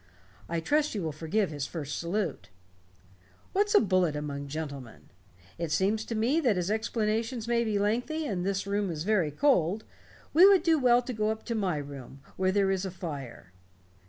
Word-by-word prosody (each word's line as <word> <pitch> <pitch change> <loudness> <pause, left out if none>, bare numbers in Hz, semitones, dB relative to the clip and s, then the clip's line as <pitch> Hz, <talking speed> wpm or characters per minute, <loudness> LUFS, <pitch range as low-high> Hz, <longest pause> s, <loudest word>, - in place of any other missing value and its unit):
I 170 0 -1
trust 295 - +1
you 200 - -2
will 160 - -2
forgive 165 +6 -1
his 145 -2 -4
first 150 -4 -5
salute. 170 - -3 1.0
What's 410 +2 +2
a - - +9
bullet 185 -6 +2
among 140 -1 -4
gentlemen? 140 -5 -7 0.5
It 170 -2 -2
seems 200 +7 +1
to 230 - -4
me 240 +9 +2
that 245 - +2
as 180 +2 -1
explanations 220 +1 -1
may 235 0 +2
be 215 -3 0
lengthy 245 +10 0
and 185 -9 -2
this 195 0 -1
room 200 0 -1
is 160 -2 -3
very 190 -6 +2
cold, 200 - +2 0.5
we 355 +5 +8
would 385 -4 +5
do 325 -3 +3
well 245 -1 +4
to 250 - -5
go 215 -1 0
up 220 0 -4
to 235 - -2
my 190 -7 0
room, 140 -2 -8
where 185 0 +1
there 195 0 +2
is 190 -1 -1
a 190 - -2
fire." 145 - -7
195 Hz, 190 wpm, -29 LUFS, 160-230 Hz, 1.0 s, a